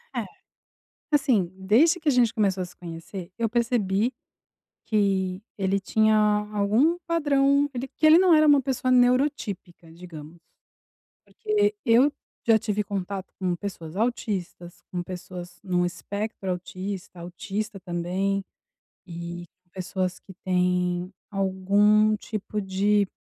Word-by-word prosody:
É, - - -1 0.9
assim, 260 - +2
desde 245 - +4
que 315 -2 0
a - - +5
gente 245 -3 +3
começou 195 -4 +1
a - - -2
se 180 - -15
conhecer, 170 +2 -8
eu 230 -1 0
percebi 230 -1 +1 0.7
que 195 -3 0
ele 195 -1 0
tinha 215 +2 +3 0.4
algum 220 +12 +2
padrão, 285 -4 +2
ele 255 +1 -4
que - - -6
ele 315 +2 +8
não 365 -2 +5
era 310 0 +5
uma 290 -2 +6
pessoa 255 -1 -1
neuro 250 +3 +5
típica, 185 - -9
digamos, 165 -2 -11 0.9
porque 420 -1 0
eu 245 +5 +5 0.4
já 225 -1 +6
tive 210 0 -1
contato 195 -1 -5
com 180 -2 0
pessoas 170 -3 -7
autistas, 190 -6 -3
com 180 -1 -3
pessoas 180 -1 -8
num 180 -2 +1
espectro 200 +3 -5
autista, 185 +1 -6
autista 195 +4 -5
também 185 +2 -2 0.6
e 170 0 -7 0.3
pessoas 185 0 -3
que 190 - -13
têm 180 0 0 0.2
algum 205 +2 +3
tipo 210 0 -5
de 200 +1 +2
200 Hz, 125 wpm, -25 LUFS, 180-235 Hz, 0.9 s, ele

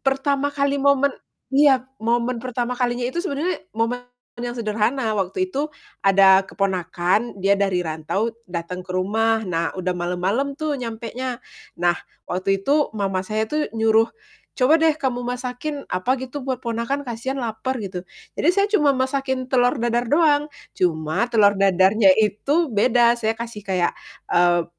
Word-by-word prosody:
pertama 275 +1 +1
kali 280 -1 0
momen 280 0 +3 0.4
iya, 270 -3 +5 0.2
momen 235 +1 0
pertama 250 -1 -3
kalinya 245 -1 -1
itu 300 +8 -2
sebenarnya 335 - -2 0.2
momen 230 +2 0 0.4
yang 240 0 -4
sederhana 220 +2 0
waktu 200 - -1
itu 290 +2 -1 0.3
ada 195 -1 +6
keponakan, 190 +3 -1
dia 195 +1 +2
dari 195 -3 +1
rantau 160 +8 -2 0.2
dateng 175 +1 -5
ke 180 - -15
rumah, 220 +4 +1
nah 165 -2 -1
udah 185 0 -1
malem-malem 185 +11 -1
tuh 310 -1 -2
nyampenya. 235 +2 -4 0.4
Nah 175 0 +3 0.3
waktu 195 +2 -1
itu 295 +1 +3
mama 195 -2 -1
saya 215 +3 -1
tuh 300 +7 -2
nyuruh, 225 0 +3 0.5
"Coba 290 +5 +4
deh 320 -1 +3
kamu 260 -5 -2
masakin 250 +4 -4
apa 185 +9 +1
gitu 260 +2 -6
buat 260 -2 -4
ponakan 235 +5 -2
kasihan 245 +3 -4
lapar." 245 +1 -3
Gitu. 195 -5 -5 0.3
Jadi 315 - 0
saya 400 - +4
cuma 290 -9 +3
masakin 265 0 -1
telur 250 +2 +3
dadar 240 0 0
doang, 295 0 +3 0.2
cuma 160 +5 0
telur 215 -4 +5
dadarnya 195 +2 +4
itu 255 - +1
beda, 235 +2 +4
saya 220 0 0
kasih 230 -2 -6
kayak, 180 -2 +1 0.4
eee, 175 -1 +4
235 Hz, 150 wpm, -22 LUFS, 195-270 Hz, 0.5 s, ada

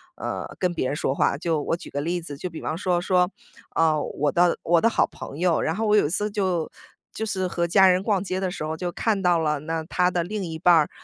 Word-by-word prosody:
呃， - - -5
跟 180 -3 0
别 130 - -1
人 145 - -2
说 135 - 0
话。 140 - +1
就 160 -2 -1
我 165 - -1
举 - - -11
个 140 - -2
例 175 +3 -1
子， 160 -4 -8
就 180 - -5
比 160 - -8
方 155 - -3
说 180 0 0
说， 180 0 +2 0.4
啊， 155 -2 +2
我 145 0 -1
的 175 0 +3
我 170 0 +3
的 230 - +4
好 - - +2
朋 140 - -9
友， 175 -2 +2
然 160 - -1
后 220 +3 -1
我 210 0 +4
有 205 - +4
一 - - -4
次 210 +4 -1
就 185 -6 -1 0.4
就 220 - -3
是 190 -3 -1
和 170 -1 -1
家 190 +2 +6
人 180 0 +4
逛 205 -4 +1
街 185 -1 -2
的 190 -1 -1
时 170 - -5
候 155 - -3
就 175 +2 -3
看 205 +2 0
到 175 -2 +3
了 150 -2 0
那 160 +1 -3
她 180 +2 +1
的 175 -1 0
另 205 +2 -4
一 160 -2 -5
半 175 0 +5
儿， 155 -2 +3
175 Hz, 290 characters per minute, -24 LUFS, 160-185 Hz, 0.4 s, 家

